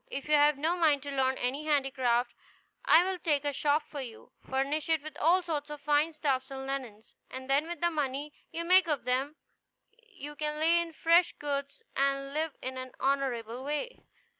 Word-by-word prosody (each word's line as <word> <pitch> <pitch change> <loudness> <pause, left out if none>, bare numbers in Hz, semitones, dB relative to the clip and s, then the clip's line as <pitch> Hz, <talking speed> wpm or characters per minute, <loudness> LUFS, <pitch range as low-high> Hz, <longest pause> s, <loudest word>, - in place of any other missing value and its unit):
If 275 - -5
you 300 - +1
have 295 -1 +5
no 320 +5 0
mind 305 -6 +3
to 285 - -5
learn 265 -1 +1
any 270 +5 -2
handicraft, 260 -5 +1 0.5
I 330 - +7
will 375 0 -2
take 295 -3 0
a 290 - 0
shop 295 +2 +1
for 285 - -7
you, 235 -4 -10
furnish 275 +4 -2
it 320 -3 +2
with 310 - -8
all 355 +4 +4
sorts 300 -3 -3
of 295 0 -7
fine 295 +2 +2
stuffs 275 -4 -1
and 265 -1 -6
linens, 255 -6 -6 0.2
and 260 0 -8
then 280 +4 +2
with 345 -2 -6
the 345 0 +2
money 290 -1 -3 0.2
you 335 +1 -4
make 370 +1 +5
of 295 -6 -1
them 265 +4 0 0.6
you 385 - -11
can 300 0 -2
lay 330 +2 +4
in 335 -1 -5
fresh 335 +2 +3
goods, 280 -1 -4
and 275 0 0
live 310 -1 -2
in 260 0 -4
an 255 -1 -8
honorable 255 -3 -1
way. 300 - -4
290 Hz, 195 wpm, -30 LUFS, 270-315 Hz, 0.6 s, I